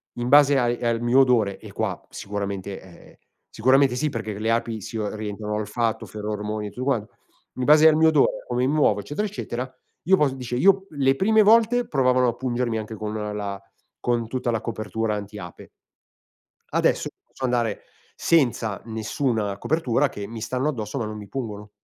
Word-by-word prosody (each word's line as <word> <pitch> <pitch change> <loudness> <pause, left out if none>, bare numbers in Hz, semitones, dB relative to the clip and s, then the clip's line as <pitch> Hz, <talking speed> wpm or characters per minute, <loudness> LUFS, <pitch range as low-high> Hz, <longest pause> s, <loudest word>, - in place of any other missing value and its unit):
in 120 0 -3
base 145 0 +6
ai 120 0 0
al 115 -1 +1
mio 120 +3 +4
odore." 115 -7 +2
E - - -11
qua - - -2
sicuramente 100 -1 -5
e 95 - -15 0.2
,ehm, - - -21 0.3
sicuramente 130 +2 +3
sì 150 +3 0
perché 110 -4 -5
le 110 +1 0
api 115 -2 -1
si 115 - -6
orientano, 105 0 -4
olfatto, 110 +2 -1
ferormoni 105 0 -4
e - - -6
tutto 125 - -6
quan 125 -7 +1 0.5
"In 130 - -2
base 150 +1 +7
al 155 - +6
mio 160 0 +5
odore, 150 -3 +2
o - - -26
come 125 +1 +1
mi 145 - +1
muovo, 105 -9 +3
eccetera, 150 - -3
eccetera, 130 -11 -5 0.3
io 190 +3 +4
posso" 140 -3 +2
dice: 125 -2 -5
"Io 195 +5 +4
le 135 -2 +2
prime 215 +6 +4
volte 230 +3 +4
provavano 130 -2 +3
a 120 - -3
pungermi 120 -2 -1
anche 110 +1 -6
con 105 +1 -5
un 105 -1 -4
la 100 -1 -4 0.4
con 120 -2 0
tutta 125 +1 -2
la 115 - -1
copertura 110 -1 -3
anti 105 0 -7
ape 90 -3 -10 1.1
adesso - - +2 0.2
posso - - -12
andare 120 -4 0 0.3
senza 120 -9 +1
nessuna 110 -2 -2
copertura 155 -6 +1
che 100 - -7
mi 115 -1 -8
stanno 130 +6 -1
addosso 110 -3 -4
ma 115 - -1
non 105 0 -6
mi 105 -1 -9
pungono." 105 -4 -6
120 Hz, 185 wpm, -24 LUFS, 105-135 Hz, 1.1 s, base